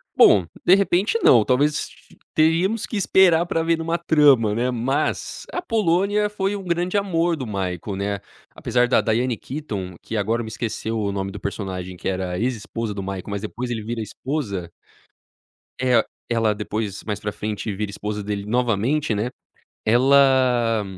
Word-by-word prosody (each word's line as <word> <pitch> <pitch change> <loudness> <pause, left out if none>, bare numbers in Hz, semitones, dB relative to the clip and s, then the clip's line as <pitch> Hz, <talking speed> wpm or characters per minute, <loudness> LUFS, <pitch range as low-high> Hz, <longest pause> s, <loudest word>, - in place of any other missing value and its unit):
Bom, 95 -5 +6 0.2
de 185 - +7
repente 200 +3 +1
não. 115 -4 +6
Talvez 140 +4 +3
s - - -3 0.4
teríamos 170 +8 +2
que 220 - -4
esperar 180 -4 +4
para 165 -1 -1
ver 165 0 +2
numa 165 +1 -1
trama, 145 -10 +4
né. 125 +3 0
Mas, 135 +5 -2
a 355 - -3
Polônia 210 - +1
foi 205 -1 -1
um 200 - -6
grande 175 +2 0
amor 175 -4 +1
do 135 -5 -5
Michael, 95 -2 -3
né. 100 +1 -2 0.4
Apesar 125 0 +1
da 125 - +3
Diane 115 +1 0
Keaton, 105 - -6
que 115 - -4
agora 115 +3 0
me 110 - -6
esqueceu 110 0 -3
o 100 -2 -1
nome 95 0 -3
do 105 - -8
personagem 95 -2 -5
que - - -6
era 90 -1 -2
ex-esposa 115 -2 -3
do 100 - -5
Michael, 95 -1 -5
mas 100 -1 -3
depois 120 +3 -5
ele 115 -3 -3
vira 115 +1 -4
esposa. 105 - -4 1.1
É, 125 -2 +3 0.3
ela 115 -2 +2
depois, 105 -1 -4
mais 105 -2 -3
pra 105 - -3
frente, 105 0 -4
vira 105 0 -3
esposa 105 +1 -4
dele 100 0 -3
novamente, 120 +4 +1
né. 105 +4 -1 0.6
Ela, 125 -2 +4
120 Hz, 165 wpm, -22 LUFS, 105-155 Hz, 1.1 s, de